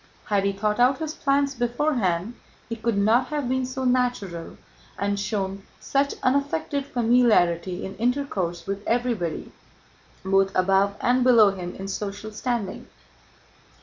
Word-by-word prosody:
Had 200 -2 +1
he 200 - +2
thought 210 +3 -1
out 255 +2 +4
his 315 -1 -4
plans 280 -1 +1
beforehand 240 - 0 0.3
he 230 - -4
could 230 -1 -1
not 225 +5 +3
have 295 -3 -2
been 260 0 0
so 260 +1 -4
natural 245 -9 -1 0.4
and 200 0 -1
shown 195 -2 -2 0.2
such 280 +1 0
unaffected 280 +1 0
familiarity 215 -8 +2
in 190 - -7
intercourse 220 -9 -1
with 200 +1 -4
everybody 230 -9 -1 0.7
both 195 0 +3
above 195 +2 +3
and 250 +1 +3
below 230 -5 +6
him 180 -2 -6
in 195 - -6
social 205 +2 -5
standing. 220 -3 -3
225 Hz, 135 wpm, -24 LUFS, 195-255 Hz, 0.7 s, below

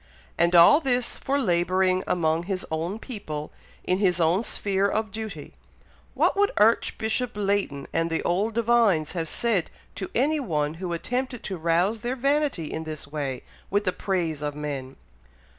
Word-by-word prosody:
and 170 +1 +2
all 175 - +8
this, 250 -5 0
for 275 +1 -1
labouring 185 -2 +2
among 160 -2 +1
his 185 +1 -4
own 165 +6 -2
people, 155 - -6 0.3
in 185 +1 0
his 185 -3 +2
own 170 +6 +3
sphere 200 -3 0
of 215 +1 -1
duty! 220 -1 -7 0.6
What - - +3
would 405 0 +3
Archbishop 220 +2 +2
Leighton 200 -9 -1
and 165 0 +1
the 165 - -1
old 205 +6 0
divines 230 -9 +3
have 165 -3 -3
said 220 -8 0 0.2
to 190 - -5
any 300 +6 +2
one 155 - -1
who 180 -2 -3
attempted 245 +8 -3
to 195 - -4
rouse 175 +6 +1
their 245 +3 -2
vanity 275 - +1
in 160 +1 -4
this 155 -1 -6
way, 140 -3 -4 0.3
with 205 +1 +1
the 185 - +1
praise 170 -6 -2
of 145 -1 -3
men?" 140 -3 -5
190 Hz, 160 wpm, -25 LUFS, 165-225 Hz, 0.6 s, all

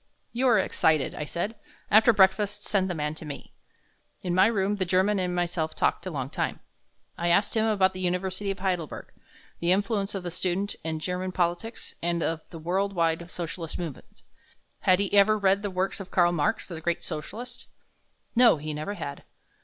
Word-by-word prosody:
"You 255 +2 +1
are 235 -3 +5
excited," 160 -6 +2
I 150 - -4
said. 175 +8 -3 0.4
"After 220 +3 +7
breakfast 205 0 +3
send 190 -2 +1
the 180 - -2
man 150 -1 -2
to 155 - -9
me." 150 -2 -8 0.7
In 180 - -1
my 185 +3 +6
room 205 -2 +1
the 190 - +1
German 190 +3 +2
and 180 -1 -1
myself 170 -2 -1
talked - - 0
a - - -1
long 135 -5 -4
time. - - -2 0.6
I 170 - 0
asked 185 +4 +3
him 220 0 +2
about 195 -3 +3
the 185 - -7
University 185 +2 -1
of 195 - -2
Heidelberg, 180 -5 -3 0.5
the 170 +1 +2
influence 200 +1 0
of 190 - -4
the 175 - -4
student 185 +3 -1
in 160 0 -1
German 180 +3 -3
politics 180 +5 -2
and 170 -1 0
of 165 -1 -1
the 165 - -9
world 190 +5 -1
wide 170 -1 0
socialistic 170 -2 -5
movement 165 -6 -8 0.6
had 185 - +4
he 200 0 -1
ever 205 +1 +6
read 195 -1 +3
the 205 - -2
works 185 +2 -1
of 195 - -8
Karl 175 -1 +4
Marx, 175 +7 0
the 170 -3 -7
great 170 +1 -1
Socialist? 240 +11 -5 0.7
No, 235 -7 +6
he 155 +1 -5
never 155 +8 -4
had. 140 -7 -6
185 Hz, 190 wpm, -27 LUFS, 170-200 Hz, 0.7 s, After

